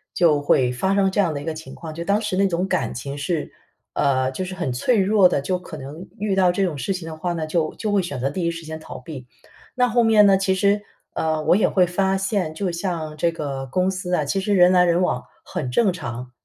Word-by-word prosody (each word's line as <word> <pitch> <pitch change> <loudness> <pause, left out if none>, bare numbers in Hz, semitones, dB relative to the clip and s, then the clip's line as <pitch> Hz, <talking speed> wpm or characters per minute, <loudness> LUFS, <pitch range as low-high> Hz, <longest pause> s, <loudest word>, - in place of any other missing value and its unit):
就 155 -5 +3
会 130 -3 +3
发 190 +11 0
生 195 -1 +3
这 205 - +2
样 180 -5 +1
的 145 - -4
一 145 - -8
个 160 - -2
情 155 -4 -10
况。 160 -2 -8
就 170 +2 -5
当 200 +4 +2
时 210 -4 -2
那 195 +1 +3
种 180 +1 -1
感 130 -10 -1
情 140 +3 -5
是 150 +2 -3 0.4
呃， 130 -2 +1
就 135 - -4
是 185 0 -6
很 175 -9 -2
脆 220 - +1
弱 195 -1 +5
的， - - +1
就 180 +6 -2
可 170 -3 -9
能 150 +6 -9
遇 205 0 -1
到 185 -2 +4
这 195 +3 0
种 170 -5 -2
事 195 - -1
情 175 -3 -6
的 160 - -6
话 175 +2 -2
呢， 165 -2 -3
就 155 0 -1
就 215 - -3
会 205 -1 +3
选 145 -7 -5
择 135 +2 -1
第 180 +4 -3
一 170 - +1
时 165 -1 -6
间 160 0 -6
逃 - - -9
避。 135 -7 -9 0.5
那 250 -1 +3
后 240 0 +2
面 220 -2 +6
呢， 195 -1 +6
其 190 0 +1
实， 200 +2 +2 0.3
呃， 155 -1 -1
我 - - +4
也 210 - +3
会 185 -2 +3
发 190 +2 +1
现， 190 -4 -1
就 180 +3 -2
像 170 -3 -3
这 170 +2 +1
个 140 -4 -4
公 185 +8 +1
司 180 -1 -4
啊， 155 -4 +1
其 195 +8 -1
实 205 +2 0
人 180 -1 +6
来 180 -1 +6
人 175 0 +2
往 125 -9 0 0.2
很 125 - -4
正 205 - +3
常。 125 -6 -6
175 Hz, 280 characters per minute, -22 LUFS, 155-190 Hz, 0.5 s, 面